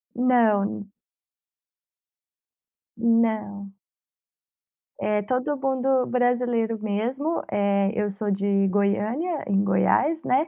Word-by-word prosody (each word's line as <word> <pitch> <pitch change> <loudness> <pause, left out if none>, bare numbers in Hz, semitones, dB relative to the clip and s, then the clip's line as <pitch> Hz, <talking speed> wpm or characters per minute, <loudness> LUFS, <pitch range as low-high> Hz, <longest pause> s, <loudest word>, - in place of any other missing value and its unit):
Não. 225 -5 +2 2.1
Não. 220 -4 0 1.3
Eh, 210 0 0
todo 255 +4 -1
mundo 265 -1 0
brasileiro 245 -2 0
mesmo. 245 +10 -2
Eh, 200 -1 +1
eu 210 -2 -1
sou 205 +1 -4
de 195 0 +1
Goiânia, 210 - -1
em 200 0 +1
Goiás, 300 - +1
né, 270 +6 +1
225 Hz, 85 wpm, -24 LUFS, 200-255 Hz, 2.1 s, Não